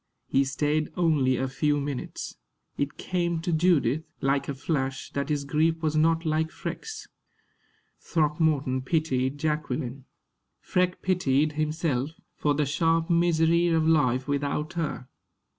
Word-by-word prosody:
He 135 - +2
stayed 150 +3 0
only 145 -7 +3
a 135 - -1
few 145 +3 +1
minutes. 140 -2 -5 0.4
It 140 0 -2
came 170 -2 -1
to 175 0 -1
Judith, 155 -4 +3 0.2
like 135 +1 0
a 140 - -2
flash, 135 -1 -2
that 140 +2 -2
his 145 -2 -1
grief 160 +3 +1
was 155 -1 +1
not 165 +2 +3
like 160 0 +1
Freke's. 440 - -6 0.9
Throckmorton 150 -4 +1
pitied 130 -2 0
Jacqueline. 150 -4 -2 0.5
Freke 180 0 0
pitied 155 -5 +2
himself, 155 -2 -1 0.2
for 145 -1 +1
the 150 0 +1
sharp 165 +3 +1
misery 170 0 +3
of 160 -2 +2
life 130 -5 +2
without 145 +2 -1
her. 155 -6 -3
155 Hz, 130 wpm, -27 LUFS, 140-165 Hz, 0.9 s, only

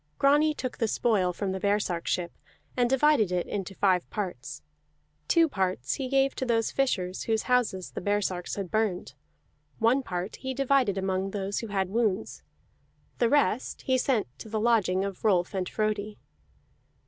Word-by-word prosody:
Grani 295 +2 +4
took 255 -3 -5
the 225 - +2
spoil 205 -5 +1
from 190 +2 -3
the 190 - -3
baresark 200 -4 0
ship, 175 -1 -1 0.4
and 245 -1 +2
divided 265 -6 +3
it 180 -1 0
into 195 -1 -5
five 185 -3 +2
parts. 130 - -5 0.6
Two 335 -1 +4
parts 185 - -1
he 260 -2 -3
gave 270 0 +2
to - - -4
those 230 -3 +1
fishers 190 -9 -1
whose 220 -1 0
houses 240 -8 0
the - - -6
baresarks 190 -3 -1
had 195 -4 -5
burned; 215 -5 -1 0.6
one 235 +5 +3
part 180 -4 -4
he 265 0 -5
divided 265 -6 +2
among 190 0 -1
those 195 0 -3
who 230 - -5
had 195 -2 -1
wounds; 220 -2 -1 0.8
the 235 - +3
rest 265 -4 +1
he 260 - +2
sent 250 -4 +1
to 220 - -9
the 220 0 -1
lodging 210 -5 +2
of 195 -2 -6
Rolf 185 -5 +2
and 185 -2 -2
Frodi. 215 -1 -2
210 Hz, 165 wpm, -28 LUFS, 185-250 Hz, 0.8 s, Grani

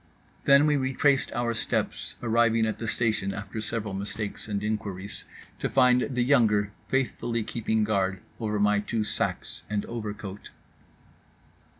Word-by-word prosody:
Then 140 +1 +7
we 150 -1 +3
retraced 135 +1 +2
our 120 0 0
steps, 115 - -2
arriving 115 -1 +3
at 110 - -2
the 115 - -3
station 105 -2 0
after 105 +1 -5
several 105 -2 -3
mistakes 100 +2 -4
and 105 -1 -2
inquiries, 100 -2 -4 0.3
to - - -1
find 125 -1 +4
the 125 - +2
younger 110 -6 +3 0.2
faithfully 120 -3 0
keeping 110 -1 0
guard 95 -3 +1 0.2
over 105 -2 -1
my 105 0 +4
two 110 +1 -1
sacs - - -2
and 105 -1 -1
overcoat. 105 -3 -6
110 Hz, 135 wpm, -27 LUFS, 105-120 Hz, 0.3 s, Then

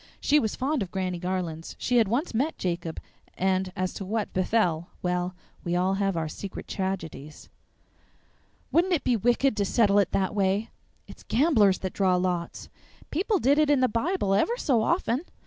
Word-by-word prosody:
(She 300 - +3
was 220 -6 -1
fond 280 +1 -1
of 190 - -3
Granny 185 -1 -3
Garlands; 175 -3 -4
she 245 - +1
had 225 -3 +4
once 245 - -1
met 275 +8 0
Jacob; 170 -2 -3 0.4
and, 190 0 0
as 185 0 -2
to - - -6
what 210 +2 -3
befell, 180 -4 +1
well, 180 0 -1 0.3
we 175 0 -1
all 185 +2 +2
have 195 -2 0
our 160 -1 -1
secret 190 +5 -7
tragedies!) 165 -6 -5 1.2
"Wouldn't 355 +3 +3
it 325 - +1
be 250 - +2
wicked 245 +4 +2
to 205 - +2
settle 205 0 +3
it 200 - +2
that 190 0 0
way?" 200 +2 0 0.3
"It's - - -13
gamblers 225 - +4
that 190 - -3
draw 190 -2 +2
lots." 180 -1 -2 0.4
"People 395 +5 +1
did 285 -1 +3
it 305 -1 +3
in 285 -3 +4
the 255 - +4
Bible 235 - 0
ever 435 - +2
so 255 - +2
often." 270 -1 +1
200 Hz, 180 wpm, -26 LUFS, 185-250 Hz, 1.2 s, had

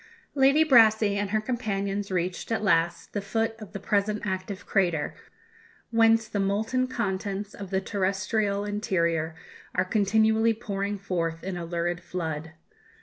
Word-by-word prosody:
Lady 275 +3 +5
Brassey 220 -6 +5
and 200 0 -1
her 215 +2 +1
companions 205 -4 -2
reached, 180 +3 -2
at 225 -1 0
last, 170 -3 +1
the 205 - -1
foot 225 +3 -1
of 215 -3 -10
the 200 - -6
present 205 +2 0
active 190 0 -4
crater, 175 -6 +1 0.8
whence 225 -1 +4
the 205 - -3
molten 220 +6 0
contents 200 -3 -3
of 200 -2 -8
the 190 0 0
terrestrial 200 +1 0
interior 170 -6 0 0.4
are 185 - +2
continually 220 +3 +3
pouring 205 -2 -3
forth 170 -4 -3
in 190 -1 -3
a 175 -1 -4
lurid 175 +1 -2
flood. 160 -3 -4
200 Hz, 145 wpm, -27 LUFS, 185-220 Hz, 0.8 s, Lady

